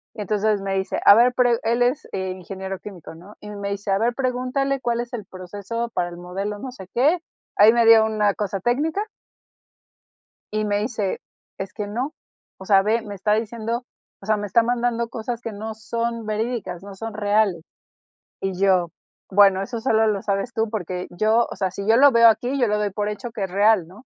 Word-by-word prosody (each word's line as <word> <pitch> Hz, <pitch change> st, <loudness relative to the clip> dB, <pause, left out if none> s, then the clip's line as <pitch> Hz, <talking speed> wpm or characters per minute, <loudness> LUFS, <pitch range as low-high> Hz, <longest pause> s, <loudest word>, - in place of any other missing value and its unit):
Entonces 210 Hz, 0 st, 0 dB
me 195 Hz, 0 st, -2 dB
dice: 190 Hz, 0 st, -1 dB
"A -, -, +10 dB
ver" 240 Hz, +4 st, +5 dB
pero 250 Hz, -1 st, +4 dB
él 235 Hz, +2 st, +2 dB
es, 250 Hz, +4 st, 0 dB
eh, 190 Hz, -1 st, -2 dB
ingeniero 190 Hz, +1 st, -6 dB
químico, 185 Hz, -7 st, -10 dB
¿no? 185 Hz, +6 st, -14 dB
Y 210 Hz, -, -9 dB
me 200 Hz, -1 st, -5 dB
dice: 200 Hz, 0 st, -3 dB
"A 195 Hz, -, +3 dB
ver, 235 Hz, +1 st, +1 dB
pregúntale 260 Hz, +1 st, -1 dB
cuál 235 Hz, 0 st, 0 dB
es 240 Hz, 0 st, -8 dB
el 220 Hz, -5 st, -5 dB
proceso 200 Hz, +6 st, -5 dB
para 175 Hz, -1 st, -1 dB
el 175 Hz, -, -10 dB
modelo 195 Hz, +4 st, -4 dB
no 260 Hz, +4 st, -6 dB
sé 190 Hz, -7 st, -11 dB
qué". 295 Hz, +9 st, +3 dB, 0.4 s
Ahí 210 Hz, +2 st, +8 dB
me 235 Hz, -1 st, +3 dB
dio 225 Hz, -1 st, +7 dB
una 210 Hz, -2 st, +1 dB
cosa 200 Hz, -1 st, -3 dB
técnica 305 Hz, -, 0 dB, 1.5 s
y 215 Hz, -, 0 dB
me 205 Hz, 0 st, 0 dB
dice: 215 Hz, -4 st, -2 dB, 0.4 s
"Es 195 Hz, -1 st, -5 dB
que 210 Hz, -2 st, -5 dB
no. 250 Hz, +9 st, -3 dB, 0.5 s
O 190 Hz, -, -11 dB
sea, 195 Hz, -2 st, +5 dB
ve, 220 Hz, +3 st, +1 dB
me 205 Hz, -2 st, -7 dB
está 205 Hz, +2 st, 0 dB
diciendo, 230 Hz, +2 st, -3 dB, 0.4 s
o -, -, -11 dB
sea, 215 Hz, 0 st, +2 dB
me 205 Hz, -, -4 dB
está 230 Hz, +4 st, +3 dB
mandando 235 Hz, 0 st, 0 dB
cosas 230 Hz, +1 st, -5 dB
que 230 Hz, -, -5 dB
no 220 Hz, +2 st, -6 dB
son 230 Hz, +1 st, -3 dB
verídicas, 215 Hz, -5 st, -3 dB
no 200 Hz, 0 st, -10 dB
son 225 Hz, +2 st, -6 dB
reales". 205 Hz, -4 st, +1 dB, 0.8 s
Y 190 Hz, -2 st, -2 dB
yo, 185 Hz, -3 st, +3 dB, 0.4 s
bueno, 195 Hz, -1 st, +5 dB
eso 235 Hz, +2 st, -5 dB
solo 225 Hz, -2 st, +2 dB
lo 205 Hz, -2 st, 0 dB
sabes 200 Hz, +5 st, -2 dB
tú, 225 Hz, -1 st, 0 dB
porque 180 Hz, -4 st, -4 dB
yo, 220 Hz, +5 st, +2 dB
o -, -, -5 dB
sea, 190 Hz, -1 st, -1 dB
si 200 Hz, +2 st, -6 dB
yo 225 Hz, -, +5 dB
lo 280 Hz, +3 st, +7 dB
veo 235 Hz, 0 st, +6 dB
aquí, 245 Hz, +5 st, +1 dB
yo 240 Hz, -, +4 dB
lo 210 Hz, 0 st, 0 dB
doy 210 Hz, -1 st, -1 dB
por 205 Hz, +1 st, -2 dB
hecho 210 Hz, +3 st, -5 dB
que 215 Hz, -3 st, -4 dB
es 190 Hz, -, -5 dB
real, 205 Hz, -3 st, +4 dB
¿no? 205 Hz, +9 st, -15 dB
215 Hz, 210 wpm, -23 LUFS, 195-235 Hz, 1.5 s, A